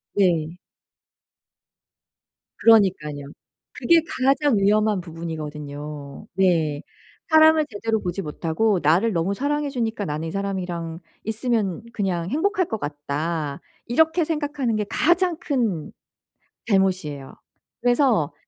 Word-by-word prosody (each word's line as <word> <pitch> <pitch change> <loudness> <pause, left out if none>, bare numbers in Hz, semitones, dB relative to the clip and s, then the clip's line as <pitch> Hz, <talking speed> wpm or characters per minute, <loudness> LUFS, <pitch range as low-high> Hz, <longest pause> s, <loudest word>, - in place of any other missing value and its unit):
네. 175 -4 +1 2.0
그러니깐요. 185 -10 +3 0.5
그게 335 -1 +4
가장 275 -1 +2
위험한 210 0 +2
부분이거든요. 150 -3 -7
네. 165 -6 +2 0.5
사람을 315 -1 +6
제대로 220 +1 -1
보지 180 +1 -3
못하고 170 +6 0
'나를 175 +10 +3
너무 175 +2 0
사랑해 290 +4 -1
주니까 225 -6 -2
나는 155 +1 -3
이 - - -6
사람이랑 180 -4 -4 0.3
있으면 220 -3 -1
그냥 180 -4 -1
행복할 370 - +1
것 220 - -3
같다.' 145 +1 -3 0.3
이렇게 320 +7 +3
생각하는 290 -7 -1
게 210 - -1
가장 345 +2 +2
큰 225 - -1 0.8
잘못이에요. 185 -9 0 0.5
그래서 245 - +2
195 Hz, 255 characters per minute, -23 LUFS, 160-245 Hz, 2.0 s, 사람을